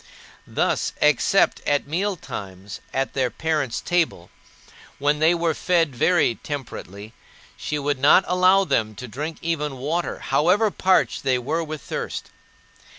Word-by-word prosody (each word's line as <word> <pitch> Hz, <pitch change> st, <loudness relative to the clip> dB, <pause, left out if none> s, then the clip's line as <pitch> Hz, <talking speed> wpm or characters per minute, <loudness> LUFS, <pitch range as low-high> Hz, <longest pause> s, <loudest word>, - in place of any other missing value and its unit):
Thus, -, -, 0 dB
except 150 Hz, +6 st, +3 dB
at 145 Hz, 0 st, +1 dB
mealtimes 115 Hz, -, -5 dB
at 135 Hz, 0 st, -2 dB
their 130 Hz, -2 st, +1 dB
parents' 150 Hz, -5 st, -2 dB
table 165 Hz, -, -1 dB, 0.7 s
when 145 Hz, +1 st, +1 dB
they 160 Hz, +3 st, +4 dB
were 170 Hz, -1 st, 0 dB
fed 165 Hz, -5 st, +1 dB
very 170 Hz, 0 st, +3 dB
temperately 110 Hz, -7 st, -7 dB, 0.4 s
she 150 Hz, -, -3 dB
would 145 Hz, -1 st, -1 dB
not 145 Hz, +7 st, +6 dB
allow 185 Hz, +2 st, +4 dB
them 110 Hz, -, 0 dB
to 125 Hz, +5 st, -8 dB
drink 150 Hz, +8 st, -5 dB
even 150 Hz, -4 st, -2 dB
water, 155 Hz, +7 st, -2 dB
however 180 Hz, +10 st, +2 dB
parched 135 Hz, -, +2 dB
they 130 Hz, -1 st, +1 dB
were 160 Hz, +7 st, -2 dB
with 155 Hz, -2 st, -7 dB
thirst. -, -, -5 dB
150 Hz, 135 wpm, -23 LUFS, 125-170 Hz, 0.7 s, not